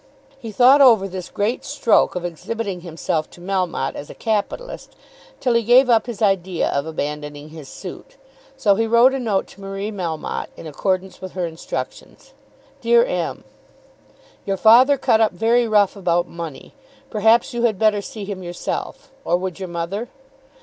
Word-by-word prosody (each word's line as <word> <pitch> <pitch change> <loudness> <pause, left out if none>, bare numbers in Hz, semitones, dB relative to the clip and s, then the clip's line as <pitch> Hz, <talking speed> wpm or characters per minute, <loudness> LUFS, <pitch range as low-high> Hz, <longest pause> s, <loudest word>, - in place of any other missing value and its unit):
He 230 -4 -7
thought 260 +6 +6
over 225 -7 +6
this 185 -2 -7
great 215 +5 -2
stroke 270 -9 +2
of 180 -1 -3
exhibiting 190 +2 -4
himself 165 -2 -3
to - - -16
Melmotte 180 -6 -2
as 145 - -8
a - - -10
capitalist 220 - -3 0.4
till 250 -3 +1
he 235 - +3
gave 245 +3 +5
up 225 0 +3
his 230 -3 -4
idea 190 -3 +1
of 140 +2 -1
abandoning 150 -1 -5
his 155 -3 -11
suit. - - -10 0.4
So 215 -7 +3
he 225 +3 0
wrote 235 +3 +5
a 270 - -1
note 215 -6 0
to 200 - -15
Marie 195 +2 -5
Melmotte 170 -6 -4
in - - -10
accordance 185 +4 -2
with 185 -1 -8
her 180 -2 -2
instructions. 165 -1 -7 0.5
DEAR 475 0 +4
M., - - -3 1.0
Your 195 -1 -2
father 250 +7 +6
cut 235 -4 +2
up 220 -3 +3
very 230 +5 +2
rough, 210 -2 +3
about 175 -3 0
money. 165 -4 -8 0.4
Perhaps 225 +2 +3
you 240 - -2
had 230 -4 +2
better 215 -1 +2
see 205 0 -8
him 195 -2 -6
yourself; 175 -1 -5
or 175 - +1
would 185 0 -5
your 185 -2 -5
mother? 175 +8 -4
200 Hz, 170 wpm, -21 LUFS, 175-230 Hz, 1.0 s, thought